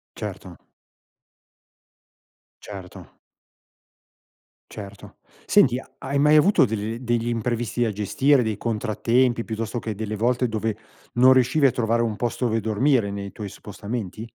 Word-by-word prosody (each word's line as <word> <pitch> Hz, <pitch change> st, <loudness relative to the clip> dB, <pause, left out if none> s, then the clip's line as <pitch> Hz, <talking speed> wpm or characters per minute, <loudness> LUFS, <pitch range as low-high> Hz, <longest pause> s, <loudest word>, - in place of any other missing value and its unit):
Certo. -, -, -7 dB, 2.0 s
Certo. 95 Hz, -3 st, -11 dB, 1.5 s
Certo, 100 Hz, -1 st, -10 dB, 0.3 s
senti, 125 Hz, +2 st, +4 dB
ha -, -, -14 dB
hai 140 Hz, +1 st, -2 dB
mai 150 Hz, +1 st, +5 dB
avuto 155 Hz, -2 st, +5 dB
degl 110 Hz, +1 st, -3 dB
degli 120 Hz, -1 st, -1 dB
imprevisti 120 Hz, 0 st, -1 dB
da 110 Hz, -, 0 dB
gestire, 130 Hz, +6 st, +2 dB
dei 110 Hz, -2 st, -2 dB
contrattempi, 115 Hz, +2 st, 0 dB
piuttosto 115 Hz, +1 st, -3 dB
che 110 Hz, -3 st, -5 dB
delle 110 Hz, 0 st, -4 dB
volte 120 Hz, +2 st, +1 dB
dove 110 Hz, 0 st, -2 dB, 0.4 s
non 125 Hz, +2 st, +6 dB
riuscivi 130 Hz, +3 st, +4 dB
a -, -, +2 dB
trovare 115 Hz, 0 st, 0 dB
un 110 Hz, -3 st, -1 dB
posto 120 Hz, +1 st, -2 dB
dove 115 Hz, 0 st, 0 dB
dormire 110 Hz, +1 st, +1 dB
nei 100 Hz, 0 st, -5 dB
tuoi 105 Hz, -2 st, -7 dB
spostamenti? 105 Hz, +1 st, -6 dB
115 Hz, 130 wpm, -23 LUFS, 105-125 Hz, 2.0 s, non